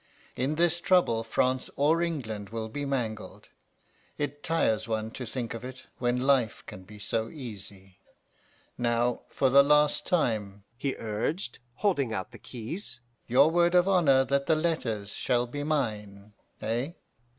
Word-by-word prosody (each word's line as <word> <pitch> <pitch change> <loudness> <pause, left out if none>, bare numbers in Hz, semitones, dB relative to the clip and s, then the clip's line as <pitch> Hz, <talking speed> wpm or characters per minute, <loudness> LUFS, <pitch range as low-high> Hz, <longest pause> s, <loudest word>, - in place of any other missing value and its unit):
In 135 +5 0
this 175 +1 +2
trouble 175 -11 +3
France 130 +3 0
or 155 +4 +3
England 110 - -3
will 110 -1 -4
be 145 +5 -4
mangled. 115 -6 -4 0.7
It 145 0 -3
tires 110 -10 +1
one 110 0 -2
to 125 0 -6
think 120 0 -4
of 115 0 -7
it 130 0 -8
when 125 0 +1
life 130 -6 +2
can 95 - -10
be 105 +2 -12
so 110 +2 -2
easy. 100 - -10 0.8
Now, 120 0 +1
for 135 -2 +1
the 140 +1 +8
last 150 +1 +3
time,' 105 - 0
he 135 +2 -2
urged, 115 - -2 0.2
holding 145 - +1
out 95 -3 -4
the - - -12
keys. 125 - -5 0.3
'Your 135 +6 +5
word 175 +1 +3
of 180 +1 +5
honour 145 -9 +4
that 140 0 0
the 160 - +4
letters 130 -11 -1
shall 120 -1 +1
be 145 +4 -5
mine 105 -9 -2 0.3
eh? 120 +8 -1
125 Hz, 150 wpm, -28 LUFS, 110-150 Hz, 0.8 s, the